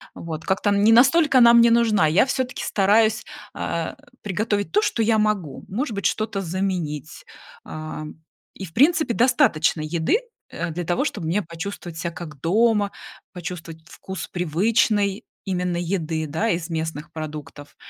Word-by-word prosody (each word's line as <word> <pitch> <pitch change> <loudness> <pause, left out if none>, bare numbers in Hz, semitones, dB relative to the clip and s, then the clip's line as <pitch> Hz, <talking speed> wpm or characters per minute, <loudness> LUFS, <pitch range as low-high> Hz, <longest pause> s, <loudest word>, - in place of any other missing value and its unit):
Вот, 160 -2 -7
как-то 205 +2 +1
не 205 +2 +4
настолько 265 +3 +5
она 235 -1 +8
мне 235 0 +6
нужна. 225 -7 +3
Я 165 +10 +4
всё-таки 260 -2 -2
стараюсь, 215 +2 +2 0.3
а, 165 -1 -3 0.3
приготовить, 205 +1 -1
то, 420 - +3
что 240 - 0
я 220 0 +3
могу. 200 -10 -1
Может 235 +5 -3
быть, 200 - -4
что-то 215 -2 -2
заменить, 175 -5 -3 0.4
а, 155 0 -6 0.5
и 195 - -7
в 160 - -14
принципе 310 0 +3
достаточно 235 - +3
еды, 160 - 0 0.3
э, - - -4
для 175 +2 -4
того, 175 +10 0
чтобы 200 - -3
мне 185 +6 +1
почувствовать 170 -1 -7
ся 170 +2 -3
как 160 -4 -9
дома, 210 +3 +2 0.4
почувствовать 170 -2 -7
вкус 190 -1 -7
привычной 200 +4 +1 0.2
именно 180 -2 -1
еды, 165 -3 -2
да, 165 +10 -1
из 170 -4 -2
местных 160 -1 -4
продуктов. 150 -2 -8
190 Hz, 150 wpm, -23 LUFS, 165-220 Hz, 0.5 s, она